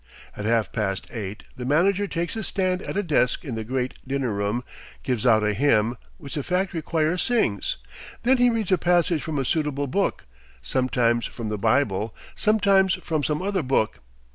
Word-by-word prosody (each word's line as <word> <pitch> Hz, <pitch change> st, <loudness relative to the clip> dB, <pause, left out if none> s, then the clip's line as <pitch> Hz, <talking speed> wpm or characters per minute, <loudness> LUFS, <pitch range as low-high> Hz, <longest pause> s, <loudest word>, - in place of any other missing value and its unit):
At 105 Hz, -, -5 dB
half 115 Hz, -3 st, +1 dB
past 95 Hz, -4 st, -2 dB
eight, 105 Hz, -3 st, -6 dB
the 125 Hz, -, -5 dB
manager 185 Hz, +9 st, +2 dB
takes 170 Hz, -2 st, -2 dB
his 220 Hz, -2 st, -4 dB
stand 185 Hz, -2 st, 0 dB
at -, -, -4 dB
a 205 Hz, -, +1 dB
desk 150 Hz, -4 st, +1 dB
in 135 Hz, -, -4 dB
the 110 Hz, -1 st, -3 dB
great 125 Hz, +2 st, -3 dB
dinner 135 Hz, -3 st, -1 dB
room, 100 Hz, +4 st, -1 dB, 0.4 s
gives 125 Hz, -2 st, 0 dB
out 110 Hz, -2 st, +5 dB
a 105 Hz, 0 st, +2 dB
hymn, 115 Hz, -2 st, +2 dB, 0.2 s
which 140 Hz, -3 st, -9 dB
the 150 Hz, -, -1 dB
factory 180 Hz, +1 st, -1 dB
choir 160 Hz, +2 st, 0 dB
sings. 125 Hz, -, +1 dB, 0.5 s
Then 260 Hz, +2 st, +4 dB
he 245 Hz, 0 st, +5 dB
reads 225 Hz, -5 st, -1 dB
a 185 Hz, -, +4 dB
passage 175 Hz, -2 st, +2 dB
from 160 Hz, -3 st, -3 dB
a 135 Hz, -, 0 dB
suitable 150 Hz, -1 st, 0 dB
book, 195 Hz, +9 st, -1 dB, 0.4 s
sometimes 120 Hz, -2 st, +1 dB
from 115 Hz, -3 st, -6 dB
the 105 Hz, -1 st, -3 dB
Bible, 110 Hz, -2 st, +1 dB, 0.2 s
sometimes 200 Hz, -4 st, +3 dB
from 155 Hz, -3 st, -2 dB
some 150 Hz, +5 st, -1 dB
other 195 Hz, -1 st, 0 dB
book. 130 Hz, -6 st, 0 dB
140 Hz, 185 wpm, -24 LUFS, 115-180 Hz, 0.5 s, out